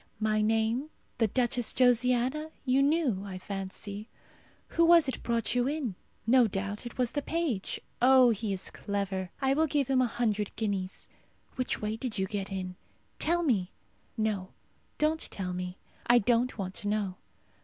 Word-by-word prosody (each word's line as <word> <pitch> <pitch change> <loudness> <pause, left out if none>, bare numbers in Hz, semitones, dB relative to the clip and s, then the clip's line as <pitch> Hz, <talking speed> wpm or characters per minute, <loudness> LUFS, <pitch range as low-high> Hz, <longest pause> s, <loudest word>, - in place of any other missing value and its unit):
My 215 0 +2
name, 225 +6 +1 0.3
the 225 - +4
Duchess 245 +1 +1
Josiana, 250 +4 +3 0.2
you 260 +1 +3
knew, 280 - +2
I 195 -2 -6
fancy. 200 +2 -5 0.6
Who 335 - +2
was 335 -2 +7
it 265 - -3
brought 230 -2 0
you 245 0 +2
in? 280 -7 -2 0.3
No 245 +1 +5
doubt 200 +3 -4
it - - -10
was 250 -1 +1
the 290 - -1
page. 295 - -2 0.2
Oh, 255 -1 +7
he 220 -1 -2
is 190 -2 -3
clever! 195 -2 -3
I 265 0 +4
will 315 +3 +2
give 280 -2 0
him 260 -1 +4
a 250 - +3
hundred 215 -3 -1
guineas. 195 -4 -3 0.5
Which 255 -4 -1
way 215 +1 -1
did 230 -2 -4
you 190 - +1
get 195 0 -4
in? 185 -1 -4 0.4
Tell 345 +2 +2
me! 205 - +1 0.4
No, 210 -4 -1 0.5
don't 310 +1 +1
tell 180 -2 -4
me; 180 0 -5 0.3
I 240 - +7
don't 240 +2 +2
want 190 -2 -4
to 205 - -3
know. 205 -3 -1
225 Hz, 165 wpm, -30 LUFS, 200-260 Hz, 0.6 s, was